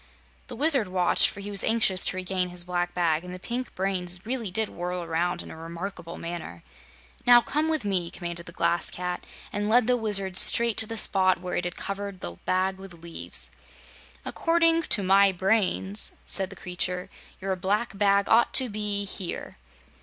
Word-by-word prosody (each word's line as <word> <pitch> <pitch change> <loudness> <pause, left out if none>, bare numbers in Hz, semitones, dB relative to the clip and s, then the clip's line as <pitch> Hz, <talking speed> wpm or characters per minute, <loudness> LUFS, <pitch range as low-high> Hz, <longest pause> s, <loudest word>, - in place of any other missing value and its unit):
The 245 - -8
Wizard 275 -4 +4
watched, 180 -1 +2
for 200 - -8
he 205 +1 -6
was 200 - +5
anxious 215 -5 +2
to 185 - +1
regain 185 0 -2
his 175 0 +2
black 175 0 -2
bag, 165 -2 +1
and 180 - -8
the 180 - -7
pink 240 +7 -5
brains 185 -1 -2
really 235 -3 -3
did 220 +4 0
whirl 180 0 -5
around 170 +2 -1
in - - -11
a - - -9
remarkable 170 +2 -7
manner. 165 - -7 0.6
"Now, 245 0 +9
come 300 +6 -1
with 310 -8 -1
me," 185 -4 0
commanded 170 -1 -7
the - - -8
Glass 170 0 +1
Cat, 180 0 -4 0.3
and 205 0 -1
led 240 +1 +4
the 250 +1 +3
Wizard 200 -5 0
straight 235 +2 +6
to 220 - +4
the 225 0 -5
spot 185 -3 +2
where 180 0 -4
it 175 - -1
had 175 - -4
covered 200 -1 -5
the 85 - -6
bag 190 +1 0
with 190 -2 -11
leaves. 170 -1 -4 0.7
"According 330 0 +2
to 205 - +6
my 195 +1 +5
brains," 195 +1 -1
said 190 -2 +1
the - - -10
creature, 180 0 -3 0.3
"your 190 0 -2
black 200 +5 -1
bag 200 0 +2
ought 230 +1 +3
to 260 -2 +4
be 205 -1 -2
here." 190 -2 -6
190 Hz, 185 wpm, -26 LUFS, 180-215 Hz, 0.7 s, Now